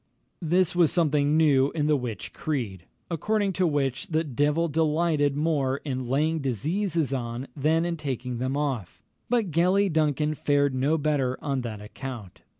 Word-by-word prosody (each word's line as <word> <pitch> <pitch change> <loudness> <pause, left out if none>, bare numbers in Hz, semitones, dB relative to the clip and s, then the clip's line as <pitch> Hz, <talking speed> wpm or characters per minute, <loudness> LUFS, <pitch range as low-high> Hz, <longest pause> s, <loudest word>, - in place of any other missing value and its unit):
This 175 +1 +2
was 170 -3 +4
something 150 -3 +2
new 140 -4 +4
in 150 -3 0
the 150 0 +3
witch 120 -7 -5
creed, 115 - -3 0.3
according 200 +4 0
to 185 0 +1
which, 145 +2 -1
the 160 -3 0
devil 150 +3 +1
delighted 155 -2 +1
more 145 -4 +1
in 130 -3 -3
laying 155 +5 +1
diseases 155 - -1
on 120 0 -4
than 160 +4 +2
in 170 -1 -2
taking 125 -4 -4
them 130 +2 -1
off; 120 - -3 0.3
but 230 -7 +1
Gellie 185 +3 +2
Duncan 150 -1 +1
fared 145 -2 +1
no 140 +5 +1
better 140 -4 0
on 140 -3 -2
that 110 -4 -6
account. 110 -2 -8
145 Hz, 155 wpm, -26 LUFS, 130-160 Hz, 0.3 s, was